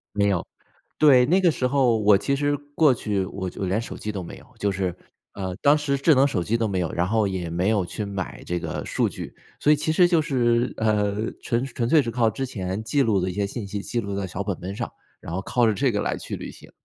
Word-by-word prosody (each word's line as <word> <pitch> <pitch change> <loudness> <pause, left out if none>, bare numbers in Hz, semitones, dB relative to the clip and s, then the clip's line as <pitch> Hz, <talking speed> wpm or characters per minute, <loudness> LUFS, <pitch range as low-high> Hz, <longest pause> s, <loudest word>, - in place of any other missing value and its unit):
没 100 0 +3
有， 95 -4 0 0.5
对， 135 -5 +6
那 185 +6 +4
个 175 -3 +4
时 130 -3 0
候 125 -4 +3
我 105 -1 +5
其 140 +7 0
实 145 0 0 0.2
过 155 -2 +5
去 105 -4 -1
我 95 0 -5
就 90 - -6
连 95 +4 0
手 115 - -6
机 105 - -4
都 95 -3 -5
没 - - -9
有， - - -17
就 100 -1 +1
是， 90 -2 -2 0.4
呃， 95 -2 -4
当 145 +1 +5
时 145 -2 0
智 150 +1 +5
能 135 +2 +5
手 95 -11 -1
机 115 +6 0
都 115 -1 0
没 95 -2 -1
有， 85 - -1
然 90 +2 0
后 110 0 +2
也 95 -3 -3
没 85 +4 0
有 105 -5 +1
去 105 +5 -5
买 100 -2 -5
这 90 - -2
个 80 -2 -4
数 - - +1
据。 - - -8 0.2
所 150 - +4
以 - - +6
其 150 +2 -1
实 175 +2 +5
就 170 -2 +3
是， 120 -4 +1
呃， 105 -1 0
纯 120 +1 0
纯 120 -3 -2
粹 155 +2 +5
是 120 - -3
靠 115 -1 +2
之 135 - -4
前 95 -3 -4
记 135 +6 +1
录 105 -6 +2
的 95 - -1
一 - - -4
些 100 +1 -1
信 100 0 -5
息， 100 0 -4
记 120 +3 -2
录 100 -3 -4
在 100 - -2
小 95 +2 -4
本 100 -3 -3
本 95 +3 -6
上， - - -4 0.3
然 80 - -8
后 95 - -2
靠 120 -2 +2
着 110 - +3
这 135 +3 +2
个 105 - -1
来 - - -1
去 - - -6
旅 - - -7
行。 - - -14
110 Hz, 290 characters per minute, -24 LUFS, 95-130 Hz, 0.5 s, 对